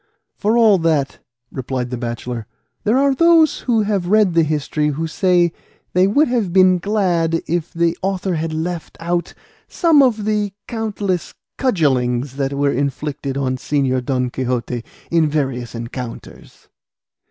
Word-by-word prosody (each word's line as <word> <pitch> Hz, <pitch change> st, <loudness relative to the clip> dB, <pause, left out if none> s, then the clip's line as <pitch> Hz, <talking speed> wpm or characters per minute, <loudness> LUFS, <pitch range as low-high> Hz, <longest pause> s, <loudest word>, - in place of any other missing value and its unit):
"For 220 Hz, +3 st, +1 dB
all 215 Hz, -5 st, +5 dB
that," 155 Hz, -4 st, 0 dB, 0.3 s
replied 125 Hz, -1 st, -4 dB
the -, -, -1 dB
bachelor, 120 Hz, -1 st, -5 dB, 0.4 s
"there 220 Hz, +4 st, +3 dB
are 275 Hz, 0 st, +3 dB
those 330 Hz, +1 st, +4 dB
who 230 Hz, -4 st, +1 dB
have 200 Hz, -4 st, -1 dB
read 210 Hz, -2 st, +3 dB
the 165 Hz, -, +4 dB
history 150 Hz, -1 st, 0 dB
who 150 Hz, +2 st, -2 dB
say 175 Hz, 0 st, +2 dB, 0.4 s
they 185 Hz, +1 st, +4 dB
would 285 Hz, +10 st, +3 dB
have 235 Hz, -7 st, 0 dB
been 185 Hz, 0 st, +5 dB
glad 175 Hz, -5 st, 0 dB
if 170 Hz, 0 st, -2 dB
the 170 Hz, -1 st, +1 dB
author 190 Hz, -1 st, -1 dB
had 160 Hz, 0 st, -2 dB
left 165 Hz, +1 st, -4 dB
out 175 Hz, +1 st, -2 dB, 0.3 s
some 325 Hz, -5 st, +4 dB
of 225 Hz, -6 st, +2 dB
the 210 Hz, -2 st, 0 dB
countless 210 Hz, -6 st, -3 dB, 0.2 s
cudgellings 135 Hz, -, +1 dB
that 135 Hz, 0 st, -1 dB
were 140 Hz, 0 st, +1 dB
inflicted 140 Hz, 0 st, -3 dB
on 130 Hz, -2 st, -1 dB
Señor 130 Hz, -2 st, 0 dB
Don 125 Hz, -1 st, -1 dB
Quixote 125 Hz, -2 st, -2 dB, 0.3 s
in 165 Hz, -2 st, +3 dB
various 135 Hz, -6 st, -2 dB
encounters." 115 Hz, +1 st, -8 dB
165 Hz, 145 wpm, -19 LUFS, 135-200 Hz, 0.4 s, all